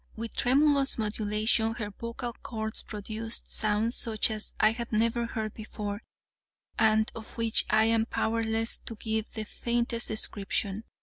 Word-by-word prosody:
With 230 Hz, 0 st, -6 dB
tremulous 280 Hz, +1 st, +3 dB
modulation, 220 Hz, +1 st, +1 dB
her 210 Hz, -3 st, -5 dB
vocal 235 Hz, +3 st, -6 dB
chords 220 Hz, -1 st, -4 dB
produced 220 Hz, +2 st, -3 dB
sounds 215 Hz, +2 st, +4 dB
such 220 Hz, -1 st, +2 dB
as 215 Hz, 0 st, -1 dB
I 215 Hz, -, +5 dB
had 235 Hz, +1 st, -5 dB
never 230 Hz, +2 st, +1 dB
heard 220 Hz, -2 st, -4 dB
before, 210 Hz, -1 st, -6 dB, 0.8 s
and 220 Hz, 0 st, +3 dB
of 225 Hz, -1 st, -9 dB
which 230 Hz, -1 st, +3 dB
I 220 Hz, 0 st, +4 dB
am 225 Hz, 0 st, +2 dB
powerless 225 Hz, 0 st, 0 dB
to 230 Hz, -, -8 dB
give 220 Hz, 0 st, -2 dB
the 220 Hz, -, -3 dB
faintest 235 Hz, +2 st, -1 dB
description. 205 Hz, 0 st, 0 dB
220 Hz, 140 wpm, -28 LUFS, 215-230 Hz, 0.8 s, I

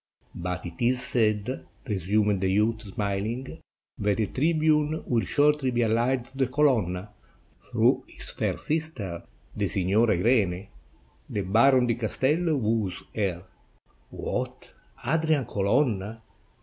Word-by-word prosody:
"But 90 Hz, +1 st, -4 dB
it 85 Hz, +3 st, -8 dB
is 125 Hz, +1 st, +3 dB
said," 110 Hz, 0 st, 0 dB, 0.2 s
resumed 105 Hz, 0 st, +1 dB
the 95 Hz, -, +1 dB
youth, 105 Hz, +3 st, +2 dB
smiUng, 105 Hz, +4 st, -3 dB, 0.4 s
"that 100 Hz, 0 st, +1 dB
the 110 Hz, -, +1 dB
tribune 155 Hz, -, +1 dB
will 115 Hz, -2 st, +1 dB
shortly 150 Hz, -2 st, +2 dB
be 120 Hz, -1 st, 0 dB
alHed 120 Hz, +3 st, +1 dB
to 135 Hz, -, -14 dB
the 130 Hz, -, +3 dB
Colonna, 110 Hz, -, +1 dB, 0.6 s
through -, -, +2 dB
his -, -, -11 dB
fair -, -, -1 dB
sister, 150 Hz, -, -3 dB, 0.3 s
the -, -, 0 dB
Signora 100 Hz, +4 st, +2 dB
Irene. 100 Hz, -3 st, +1 dB, 0.6 s
The 105 Hz, -, -2 dB
Baron 125 Hz, +7 st, +4 dB
di 120 Hz, -, +2 dB
Castello 145 Hz, +8 st, 0 dB
woos 110 Hz, -6 st, -1 dB
her." 95 Hz, -4 st, -2 dB, 0.6 s
"What, -, -, -4 dB, 0.3 s
Adrian 155 Hz, -4 st, +2 dB
Colonna! 110 Hz, 0 st, 0 dB
115 Hz, 125 wpm, -27 LUFS, 100-130 Hz, 0.6 s, Baron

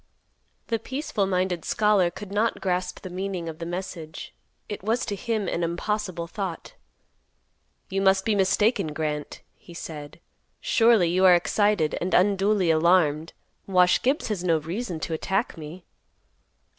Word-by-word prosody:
The 230 Hz, -2 st, 0 dB
peaceful 245 Hz, -5 st, -2 dB
minded 180 Hz, -2 st, -1 dB
scholar 210 Hz, -4 st, +3 dB
could 190 Hz, +3 st, -10 dB
not 215 Hz, +3 st, 0 dB
grasp 180 Hz, -1 st, -2 dB
the 185 Hz, -, -7 dB
meaning 185 Hz, -2 st, -4 dB
of 160 Hz, 0 st, -7 dB
the 165 Hz, -, -5 dB
message; 175 Hz, -3 st, -6 dB, 0.3 s
it 205 Hz, -, -6 dB
was 225 Hz, +5 st, 0 dB
to 205 Hz, -, -3 dB
him 215 Hz, -1 st, -2 dB
an 170 Hz, -, -1 dB
impossible 175 Hz, +1 st, -2 dB
thought; 185 Hz, -, -6 dB, 1.1 s
"You 195 Hz, +1 st, -2 dB
must 190 Hz, 0 st, +3 dB
be 220 Hz, -, +2 dB
mistaken, 200 Hz, -3 st, +2 dB
Grant," 150 Hz, -1 st, -4 dB
he 170 Hz, -, -15 dB
said. 150 Hz, -2 st, -8 dB, 0.4 s
"Surely 225 Hz, -6 st, +4 dB
you 185 Hz, +2 st, +1 dB
are 180 Hz, -1 st, +8 dB
excited 190 Hz, -2 st, +1 dB
and 180 Hz, +2 st, 0 dB
unduly 195 Hz, -1 st, +3 dB
alarmed. 160 Hz, -1 st, +2 dB, 0.3 s
Wash 180 Hz, -2 st, +4 dB
Gibbs 265 Hz, 0 st, 0 dB
has 200 Hz, -5 st, -2 dB
no 165 Hz, -3 st, +3 dB
reason 170 Hz, +3 st, -4 dB
to 165 Hz, -, -3 dB
attack 190 Hz, +7 st, -1 dB
me." 165 Hz, +3 st, -10 dB
185 Hz, 145 wpm, -25 LUFS, 170-205 Hz, 1.1 s, are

